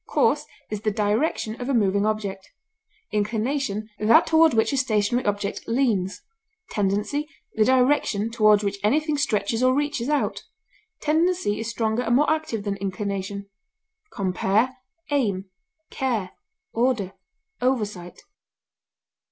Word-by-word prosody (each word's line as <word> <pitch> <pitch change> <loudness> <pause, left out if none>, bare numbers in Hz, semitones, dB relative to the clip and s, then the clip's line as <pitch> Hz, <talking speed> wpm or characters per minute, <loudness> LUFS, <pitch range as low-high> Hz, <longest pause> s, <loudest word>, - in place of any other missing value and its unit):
Course - - +2 0.2
is 210 -1 -3
the 215 - +1
direction 215 +3 -1
of 245 - -3
a 275 - +2
moving 200 -1 +2
object; 200 -3 -3 0.6
inclination, 215 +1 -1
that 220 +2 +5
toward 320 -4 +4
which 225 +5 +2
a - - +1
stationary 240 -1 +1
object 205 0 -2
leans; 230 -6 0 0.5
tendency, 210 +9 -1 0.2
the 220 - +3
direction 250 -4 +2
toward 215 -2 +4
which 200 0 -2
anything 300 +8 +2
stretches 225 -5 0
or 255 0 +4
reaches 290 -3 -1
out; 295 -1 0 0.6
tendency 320 - +1
is 225 0 -3
stronger 225 0 0
and 240 -1 +1
more 295 +4 +3
active 310 -9 -2
than 200 -1 -2
inclination. 200 0 -4 0.6
Compare 200 +6 +1 0.4
AIM; 200 -9 0 0.4
CARE; 230 -9 -1 0.4
ORDER; 230 -5 0 0.5
OVERSIGHT. 210 -9 -2
220 Hz, 120 wpm, -24 LUFS, 200-260 Hz, 0.6 s, that